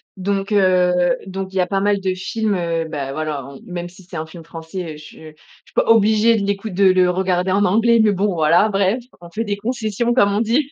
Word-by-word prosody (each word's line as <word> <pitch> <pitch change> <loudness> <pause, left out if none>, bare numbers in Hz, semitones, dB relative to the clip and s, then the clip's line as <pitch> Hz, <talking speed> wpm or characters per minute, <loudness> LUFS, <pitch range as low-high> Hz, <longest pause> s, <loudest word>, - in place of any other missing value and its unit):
donc, 195 +1 -2
heu, 180 -3 +3
donc 190 0 -5
il - - -4
y - - +2
a 180 - +2
pas 195 +1 -1
mal 205 0 +1
de 190 -1 -1
films, 210 +3 -2
heu, 170 -2 -2
bah 140 -3 -4
voilà 155 -2 -3
en 140 0 -11
même 175 -1 -6
si 185 +2 -17
c'est 175 0 -12
un 155 - -4
film 165 +1 -12
français, 165 +1 -7
heu, - - -11
je 150 - -13
je - - -11 0.6
suis - - -23
pas - - +2
obligée 220 +1 +4
de 200 - -2
l'écout 200 +2 -2
de 195 +1 +1
le 185 -1 +4
regarder 180 0 0
en 200 +2 +2
anglais, 230 +5 +3
mais 215 - +4
bon 200 0 0
voilà, 165 +6 +3
bref. 195 +3 +1 0.2
«On 170 - -11
fait 220 +4 -2
des 205 -2 -3
concessions,» 235 +1 -2
comme 205 -5 +3
on 205 - +1
dit! 255 +6 0
190 Hz, 245 wpm, -19 LUFS, 175-210 Hz, 0.6 s, obligée